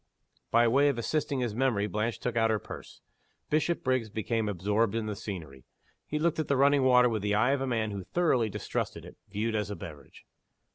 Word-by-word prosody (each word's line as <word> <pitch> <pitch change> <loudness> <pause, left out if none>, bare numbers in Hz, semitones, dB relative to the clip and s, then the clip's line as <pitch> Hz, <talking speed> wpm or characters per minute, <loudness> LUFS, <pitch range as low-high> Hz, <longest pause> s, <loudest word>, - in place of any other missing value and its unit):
By 120 +1 +4
way 140 +5 +4
of 140 - -1
assisting 140 +2 -1
his 120 -4 -1
memory 115 -4 +1
Blanche 105 +2 -2
took 125 -2 -3
out 115 -1 +3
her 110 - +2
purse. - - -10 0.5
Bishopriggs 130 -7 +1
became 110 +1 -1
absorbed 105 +3 0
in 115 -1 -1
the 105 -1 -3
scenery. 80 - -7 0.4
He 150 - -2
looked 160 +1 +1
at 155 - -1
the 140 - +2
running 140 +1 +4
water 125 -1 +6
with 110 -3 -1
the 105 0 0
eye 110 +5 +3
of 140 -1 0
a 135 - -1
man 110 -4 0
who 100 -2 -5
thoroughly 130 - +1
distrusted - - -4
it, - - -12
viewed 105 +3 -2
as 105 -2 -1
a 105 - -4
beverage. 75 -6 -11
115 Hz, 205 wpm, -29 LUFS, 105-130 Hz, 0.5 s, water